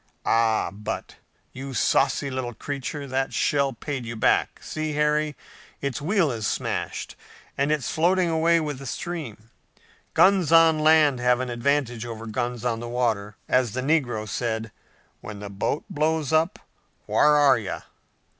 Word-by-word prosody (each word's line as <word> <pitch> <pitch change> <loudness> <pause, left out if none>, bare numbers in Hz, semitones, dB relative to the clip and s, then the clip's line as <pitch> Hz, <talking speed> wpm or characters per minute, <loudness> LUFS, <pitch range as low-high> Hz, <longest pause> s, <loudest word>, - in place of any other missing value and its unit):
Ah, 115 -1 +2
but, 105 +1 -6 0.4
you 135 0 -7
saucy 135 +3 +2
little 125 -2 -4
creature, 140 +3 -5
that 135 0 -2
shell 140 -2 +2
paid 135 +2 -5
you 115 0 -6
back! 110 - +1
See, 155 -1 -3
Harry, 150 0 +1 0.4
its 140 -1 -3
wheel 170 -1 +2
is 110 -3 -2
smashed, - - -3 0.4
and 140 +2 +1
it's 150 -4 -1
floating 180 +3 +2
away 165 +1 +3
with 150 -4 -4
the 135 - -8
stream! 120 -9 -6 0.6
Guns 185 -4 +4
on 165 -1 +6
land 155 -4 +4
have 125 0 +3
an 130 -1 -3
advantage 120 -1 0
over 115 -1 -7
guns 120 +1 -3
on 115 -2 0
the 120 0 -6
water! 110 -4 -1
As 125 -4 +2
the 130 - -2
negro 130 -7 0
said, 110 +2 -3 0.5
'When 105 -1 -8
the 100 -1 -7
boat 100 +9 -2
blows 160 -4 0
up, 160 +3 +2 0.5
whar 150 0 +4
are 140 -4 +5
you? 100 -3 -5
135 Hz, 155 wpm, -25 LUFS, 115-155 Hz, 0.6 s, on